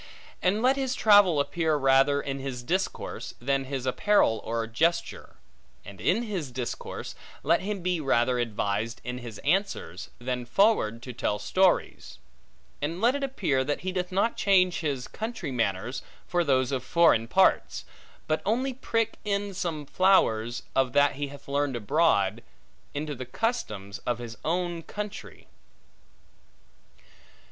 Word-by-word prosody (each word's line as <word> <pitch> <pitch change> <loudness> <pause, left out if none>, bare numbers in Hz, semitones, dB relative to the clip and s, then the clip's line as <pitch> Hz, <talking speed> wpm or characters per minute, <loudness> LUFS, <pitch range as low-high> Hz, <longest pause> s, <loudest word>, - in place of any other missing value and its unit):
And 205 +5 +1
let 265 +2 +4
his 265 -2 -1
travel 205 -9 +6
appear 155 +3 +1
rather 135 0 +4
in 135 0 -4
his 130 -2 -5
discourse, 185 +8 -3
than 135 +2 0
his 135 -1 -4
apparel 130 - +2
or 115 0 -2
gesture; 160 +10 -1 0.5
and 100 -3 -11
in 215 - +2
his 190 - -4
discourse, 125 -1 -5 0.3
let - - +3
him 200 -1 -4
be 180 -2 0
rather 125 -2 +2
advised 110 0 -2
in 125 0 -4
his 120 -4 -8
answers, 155 - -1
than 125 0 -4
forward 120 - +2
to 125 - -7
tell 105 - -1
stories; 185 - +1 0.6
and 160 +5 -2
let 235 +4 +4
it 285 0 -3
appear 180 - 0
that 145 +2 -2
he 185 - -2
doth 180 0 -3
not 200 +5 +1
change 185 -3 +3
his 140 -5 -2
country 225 - -5
manners, 115 +1 -1 0.3
for 175 -1 +1
those 130 -3 +2
of 130 -2 -2
foreign 145 -6 +4
parts; 190 +9 +2 0.4
but 155 0 0
only 255 +6 0
prick 230 -3 -1
in 200 -1 -1
some 165 -5 -3
flowers, 120 - +2
of 130 -1 +2
that 145 0 +4
he 145 0 -2
hath 140 0 -12
learned 140 -1 0
abroad, 120 - +2 0.5
into 150 +1 -3
the 130 -2 -6
customs 110 - -3
of 120 -2 -2
his 120 -1 -7
own 175 +1 -1
country. 210 +4 -7
145 Hz, 145 wpm, -27 LUFS, 125-190 Hz, 0.6 s, travel